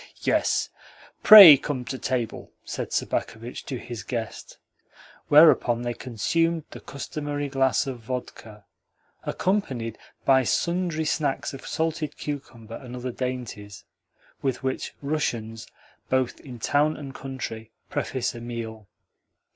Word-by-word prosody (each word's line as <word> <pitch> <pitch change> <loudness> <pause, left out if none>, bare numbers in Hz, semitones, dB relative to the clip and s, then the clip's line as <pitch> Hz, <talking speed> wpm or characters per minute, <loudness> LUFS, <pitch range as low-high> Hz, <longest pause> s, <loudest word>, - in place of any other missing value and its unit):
"Yes; - - +1 0.5
pray 195 -9 +12
come 130 -2 -4
to 130 +1 -5
table," 125 -3 -3
said - - -5
Sobakevitch 115 +2 -3
to 130 - -4
his 120 -2 -7
guest; 115 -3 -6 0.7
whereupon 145 -6 +6
they 120 0 -2
consumed 160 +8 -1
the - - -9
customary 145 0 -5
glass 135 -1 +1
of 130 -3 -5
vodka 115 -3 -7 0.6
(accompanied 130 - -1 0.3
by 130 -1 +5
sundry 170 +3 0
snacks 140 -2 -1
of 135 - -9
salted 160 -1 -2
cucumber 130 -6 -7
and 125 -2 -9
other 125 0 -4
dainties) 120 -6 -5 0.6
with 135 -1 -2
which 130 0 -3
Russians, 115 -7 -3 0.4
both 130 -1 0
in 125 -4 -10
town 145 +6 +1
and 140 -2 -8
country, 130 -5 -6 0.2
preface 130 -2 -2
a 120 - -9
meal. 115 -3 -7
130 Hz, 120 wpm, -25 LUFS, 120-145 Hz, 0.7 s, pray